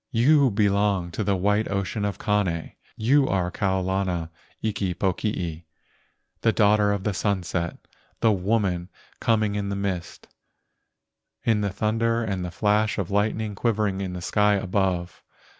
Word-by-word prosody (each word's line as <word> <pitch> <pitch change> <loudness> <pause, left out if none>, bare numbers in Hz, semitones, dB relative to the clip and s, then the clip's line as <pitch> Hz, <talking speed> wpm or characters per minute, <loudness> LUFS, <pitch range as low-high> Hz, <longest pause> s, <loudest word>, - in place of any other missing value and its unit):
You 140 +4 +4
belong 100 -4 +1
to 105 - -2
the 100 -1 +1
white 105 +3 +1
ocean 100 +2 -2
of 100 - -2
Kane, 95 -6 0 0.3
You 135 +5 +3
are 90 -2 0
Kau 95 -1 0
lana 90 -3 -1 0.3
iki 100 -4 -2
pokii, 90 -4 -2 0.8
The 115 - +4
daughter 105 -1 +3
of 100 -2 -2
the 105 - 0
sunset, 85 -2 -1 0.4
The 115 - +4
woman 95 -3 0 0.3
coming 110 -3 +2
in 100 -1 -2
the 100 - -2
mist, 95 -3 -4 1.2
In 110 -2 +2
the 100 - 0
thunder 115 +4 0
and 95 -4 -2
the 90 - -3
flash 105 +4 +1
of 100 -2 -3
lightning 105 +1 0
Quivering 105 -2 0
in 95 -2 -4
the 90 -1 -6
sky 105 +2 +3
above. 95 -2 -1
100 Hz, 145 wpm, -25 LUFS, 95-105 Hz, 1.2 s, You